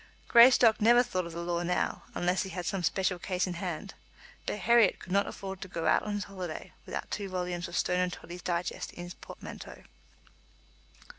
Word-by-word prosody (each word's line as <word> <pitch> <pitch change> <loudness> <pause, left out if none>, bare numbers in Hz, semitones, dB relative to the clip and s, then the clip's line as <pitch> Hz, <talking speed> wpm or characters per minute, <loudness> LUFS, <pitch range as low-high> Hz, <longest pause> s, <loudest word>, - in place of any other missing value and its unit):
Greystock 235 -2 +7
never 240 +3 +6
thought 185 -7 -2
of 170 - -9
the 170 +1 -4
law 170 0 -1
now, 175 +1 -1
unless 180 +1 +1
he 190 - -4
had 180 -2 -5
some 195 0 -1
special 180 +2 0
case 180 0 -1
in 180 - -3
hand; 180 +2 -5 0.5
but - - -1
Herriot 230 0 +4
could 185 - -11
not 200 +1 +3
afford 190 -1 -6
to - - -5
go 165 -2 -4
out 155 - +4
on 210 -1 -3
his 205 - -2
holiday 185 -5 -7
without - - -5
two 200 -2 -3
volumes 180 -1 -3
of 175 - -4
Stone 180 0 +1
and 180 0 +1
Toddy's 175 +1 -9
Digest 175 0 -3
in 175 - -7
his 175 0 -7
portmanteau. - - -10
180 Hz, 200 wpm, -30 LUFS, 175-200 Hz, 0.5 s, Greystock